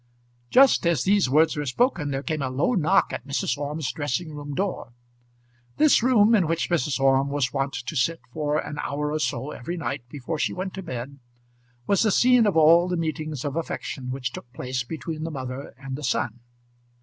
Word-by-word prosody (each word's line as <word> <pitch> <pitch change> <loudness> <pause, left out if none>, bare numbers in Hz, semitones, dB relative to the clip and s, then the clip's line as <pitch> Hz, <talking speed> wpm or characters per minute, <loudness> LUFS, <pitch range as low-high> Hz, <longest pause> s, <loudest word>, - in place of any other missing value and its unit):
Just 265 -8 +5
as 165 -7 +2
these 195 -7 +3
words 155 +4 +4
were 150 -1 -3
spoken, 170 - +1
there 135 0 -3
came 155 -2 -2
a 135 - -1
low 140 - 0
knock 160 -8 +2
at 125 - -6
Mrs. 140 -3 -1
Orme's 145 0 -3
dressing 155 +2 -3
room 145 -1 -6
door. 185 -11 -3 0.8
This 305 -5 +5
room, 230 -3 +4
in 190 -7 +4
which 165 +2 -1
Mrs. 150 -4 +1
Orme 135 0 +3
was 140 -3 -1
wont 135 0 -1
to 125 +6 -5
sit 165 +5 +1
for 150 -1 0
an 150 -1 -4
hour 150 +1 -2
or 155 - -1
so 140 -1 -2
every 170 +8 -5
night 145 -4 -3
before 145 +4 -5
she - - 0
went 185 +1 -4
to 190 - -6
bed, 140 -4 -6 0.7
was 200 - +2
the 220 - +3
scene 245 +2 +5
of 195 - +1
all 165 +3 +6
the 180 -1 -1
meetings 155 -3 -3
of 145 0 -3
affection 135 -5 -4
which 130 -1 -3
took 125 - -10
place 125 0 -3
between 160 +3 -6
the 165 - -3
mother 130 -2 -6
and 135 -1 -6
the 150 - -8
son. 120 -2 -1
150 Hz, 200 wpm, -25 LUFS, 135-170 Hz, 0.8 s, all